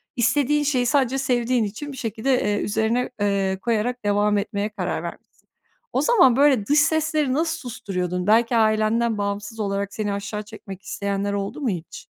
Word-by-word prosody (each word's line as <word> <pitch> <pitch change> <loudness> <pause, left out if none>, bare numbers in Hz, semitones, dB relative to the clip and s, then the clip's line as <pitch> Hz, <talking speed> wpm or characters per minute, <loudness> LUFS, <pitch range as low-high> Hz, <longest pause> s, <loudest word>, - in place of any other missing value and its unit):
istediğin 290 +5 +2
şeyi 260 -4 +1
sadece 270 0 +2
sevdiğin 245 -2 +1
için 220 +8 -5
bir 265 - -9
şekilde, 235 +3 0
eee, 205 0 0
üzerine, 220 +4 0
eee, 195 -2 +1
koyarak 235 +2 -1
devam 205 0 +2
etmeye 200 +1 -2
karar 180 -5 -3
vermişsin. 170 - -7 0.7
O - - +2
zaman 360 - +5
böyle 270 -7 +4
dış 290 +4 +4
sesleri 300 -2 +1
nasıl 320 +3 0
susturuyordun? 180 -7 -4
Belki 230 +2 +4
ailenden 220 +1 +2
bağımsız 205 +2 -4
olarak 200 -1 -2
seni 205 -2 -2
aşağı 205 +1 -4
çekmek 200 -3 -10
isteyenler 200 0 -2
oldu 200 +9 -4
mu 255 - 0
hiç? 175 -4 -6
220 Hz, 160 wpm, -23 LUFS, 200-255 Hz, 0.7 s, zaman